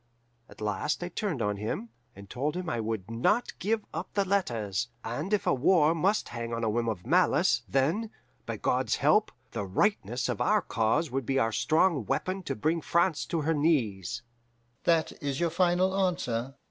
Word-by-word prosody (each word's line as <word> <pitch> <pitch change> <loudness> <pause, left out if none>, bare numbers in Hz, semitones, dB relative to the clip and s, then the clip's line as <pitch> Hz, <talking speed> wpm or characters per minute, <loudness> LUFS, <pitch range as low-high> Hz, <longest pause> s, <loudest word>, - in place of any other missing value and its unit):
At - - -15
last 105 - -1
I 175 - -4
turned 180 - -2
on 105 0 0
him, 110 +3 -4 0.3
and 100 0 -11
told 145 - -2
him 180 -1 -4
I 120 - -1
would 110 -2 -3
not 165 - +1
give 215 +2 0
up - - -5
the 200 -1 +2
letters, 120 - 0 0.2
and 145 - -4
if 210 -2 +1
a - - +3
war 155 +3 +4
must 190 +6 +1
hang 115 0 -4
on 115 - -3
a 110 - +1
whim 115 +1 0
of 90 -5 -4
malice, - - +3
then, 160 +12 +1 0.4
by - - -3
God's - - +1
help, - - +3 0.2
the - - -3
rightness 120 - 0
of - - -2
our - - +3
cause 115 +7 0
would 130 -2 -2
be 135 - +1
our 115 -4 +2
strong 155 - +2
weapon 185 +1 -1
to 135 - -1
bring 160 +8 0
France 170 -1 +1
to 165 - -1
her 160 +2 +1
knees. 120 - 0 0.6
"'That 165 -2 +3
is 140 -2 -2
your 170 -1 +1
final 180 +2 +2
answer? 135 -10 -1
140 Hz, 185 wpm, -29 LUFS, 115-175 Hz, 0.6 s, war